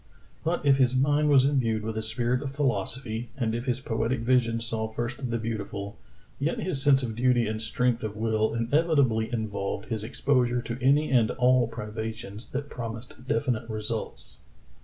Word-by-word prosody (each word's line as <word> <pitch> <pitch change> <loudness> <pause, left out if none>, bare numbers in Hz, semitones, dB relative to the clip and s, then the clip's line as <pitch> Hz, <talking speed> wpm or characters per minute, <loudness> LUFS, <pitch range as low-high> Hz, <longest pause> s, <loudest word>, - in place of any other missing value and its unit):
But 165 -1 -1
if 140 -1 +5
his 130 -1 +3
mind 145 +3 +3
was 135 -2 +6
imbued 115 -6 +1
with 110 0 -3
a 110 - -1
spirit 120 +3 0
of 140 - -3
philosophy, 120 -3 -1
and 115 -4 0
if 120 +2 -3
his 125 -1 +1
poetic 115 0 -1
vision 115 -1 +2
saw 110 -1 -2
first 120 +3 -4
the 120 - 0
beautiful, 105 -2 -4 0.4
yet 145 +4 0
his 145 -8 -1
sense 135 -1 +4
of 115 -3 -3
duty 120 0 +3
and 110 0 -3
strength 120 +2 0
of 105 -1 -4
will 110 0 +1
inevitably 120 -3 +2
involved 110 +2 -3
his 110 -3 -2
exposure 125 0 +1
to 120 +1 -5
any 140 +4 +3
and 120 -4 +4
all 125 -1 +3
privations 110 -1 -6
that 140 +2 -4
promised 120 0 -7
definite 130 -6 0
results. 110 +1 -4
120 Hz, 170 wpm, -27 LUFS, 110-130 Hz, 0.4 s, was